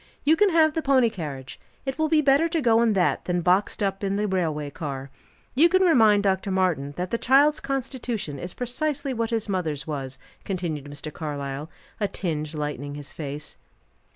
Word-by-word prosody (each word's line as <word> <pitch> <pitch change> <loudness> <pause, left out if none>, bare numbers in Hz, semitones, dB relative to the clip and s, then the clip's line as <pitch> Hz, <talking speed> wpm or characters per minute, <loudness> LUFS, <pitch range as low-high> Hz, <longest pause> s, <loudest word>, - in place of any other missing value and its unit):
You 310 +2 +5
can 415 +3 +4
have 320 -3 +4
the 320 - -1
pony 260 -5 +3
carriage, 145 - -7 0.3
it 270 +2 -3
will 315 0 +2
be 310 -1 +4
better 285 +3 +4
to 330 0 0
go 230 -5 +4
in 230 -2 +3
that 185 -3 +1
than 180 -1 0
boxed 185 +4 +2
up 195 0 -1
in 195 0 0
the 210 +1 0
railway 160 -6 -1
carriage. 135 -3 -6 0.4
You 315 +7 +5
can 375 +1 +4
remind 220 - +5
Dr. 190 0 +1
Martin 180 -7 0
that 180 0 -3
the 235 - 0
child's 290 +4 +4
constitution 245 - -3
is 175 +4 -6
precisely 275 +3 -2
what 230 -2 -1
his 225 -2 -1
mother's 160 -8 -2
was," 135 -4 -5 0.3
continued 170 -7 -3
Mr. 145 +1 -7
Carlyle, 145 -1 -5 0.3
a 205 - +1
tinge 155 -5 -3
lightening 145 -1 -4
his 145 0 -8
face. 150 0 -6
195 Hz, 185 wpm, -25 LUFS, -, 0.4 s, You